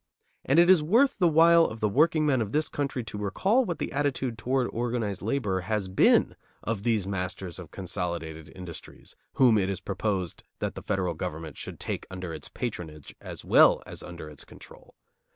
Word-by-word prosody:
And 135 - +2
it 170 +1 +7
is 185 -3 +6
worth 230 - +3
the 180 - +5
while 165 +1 +6
of 110 - -5
the 105 - +2
workingmen 150 +2 +3
of 105 -1 -3
the 155 0 +1
country 135 -3 -2
to 105 -2 -7
recall 195 - +1
what 175 -5 -3
the - - -4
attitude 135 -3 -1
toward 125 +3 0
organized 115 -4 -2
labor 105 -4 -1
has 100 +2 -2
been 95 - +4 0.3
of 110 -3 -2
these 110 -3 +1
masters 90 -2 -4
of 85 -4 -9
consolidated 85 -4 -4
industries 90 -3 -11 0.2
whom 120 -5 +5
it 95 -1 0
is 95 -2 -2
proposed 95 -2 -3 0.2
that - - -3
the - - -8
federal 95 -4 -1
government 80 -2 -5
should - - -8
take - - -4
under 90 -2 -6
its 80 - -7
patronage 80 - -6
as - - -8
well - - +6
as - - -8
under 85 -3 -8
its 75 -2 -9
control. - - -15
105 Hz, 185 wpm, -27 LUFS, 90-140 Hz, 0.3 s, it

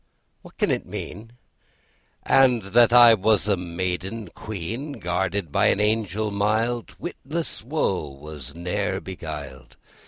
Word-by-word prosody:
What - - -16
can - - +1
it - - -2
mean? 115 +3 -7 0.9
And 125 -4 +4
that 115 +4 +4
I 120 -1 +9
was 105 -1 +2
a 100 - +3
maiden 90 +4 -4
Queen 110 - -6
Guarded 90 - -2
by - - +3
an - - +2
Angel 105 0 0
mild: 110 +4 0
Witless 165 -1 -5
woe 115 - -1
was 70 0 -9
ne'er 95 +3 -2
beguiled! 70 -8 -8
100 Hz, 125 wpm, -24 LUFS, 85-115 Hz, 0.9 s, I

